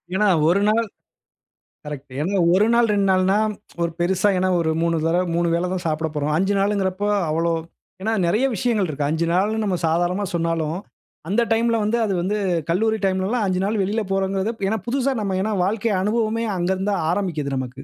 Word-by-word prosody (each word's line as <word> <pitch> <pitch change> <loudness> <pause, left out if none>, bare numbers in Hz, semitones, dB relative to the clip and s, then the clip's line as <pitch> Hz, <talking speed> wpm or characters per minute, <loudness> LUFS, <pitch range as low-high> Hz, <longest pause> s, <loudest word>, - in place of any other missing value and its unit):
ஏன்னா, 210 +1 +3 0.2
1 195 +3 +3
நாள் 230 +1 +2 1.0
கரெக்ட்டு. 140 -3 -8
ஏன்னா 190 +4 0
1 200 +3 +4
நாள், 235 -1 +4
2 200 -1 +2
நாள்ன்னா 185 +2 +3 0.5
ஒரு 170 - -1
பெருசா 185 +3 +2
ஏன்னா 185 0 +1
ஒரு 160 -1 +1
3 170 -1 +1
தடவ, 175 +2 +2
3 170 0 +1
வேள 175 +2 0
தான் 185 - -3
சாப்பிடப் 155 0 -2
போறோம். 150 +1 -1
5 195 +3 +1
நாள் 200 +1 +2
இங்குறப்போ 190 +1 -1 0.2
அவ்ளோ 165 +2 +1 0.5
ஏன்னா 220 +2 0
நெறய 215 +10 +2
விஷயங்கள் 210 -3 0
இருக்கு. 145 -1 -2
5 160 +2 0
நாள்ன்னு 215 +5 +1
நம்ம 195 -3 0
சாதாரணமா 175 +4 0
சொன்னாலும், 165 -1 -1 0.5
அந்த 210 +5 +2
டைம்ல 230 +1 +2
வந்து, 220 +3 +1
அது 195 - -1
வந்து 205 +4 -1 0.3
கல்லூரி 220 +5 +1
டைம்லலாம் 195 +4 0
5 185 0 0
நாள் 210 0 -1
வெளியில 210 +3 0
போறோங்குறது 195 +2 0 0.2
ஏன்னா 220 0 -1
புதுசா, 270 +2 0
நம்ம 190 -2 -1
ஏன்னா, 215 +2 -1
வாழ்க்கை 215 +3 0
அனுபவமே 225 +2 0
அங்க 175 +1 -1
இருந்து 195 +2 -1
தான் 175 -5 -1
ஆரம்பிக்குது 155 -8 -2
நமக்கு. 130 -1 -3
190 Hz, 185 wpm, -22 LUFS, 170-210 Hz, 1.0 s, 1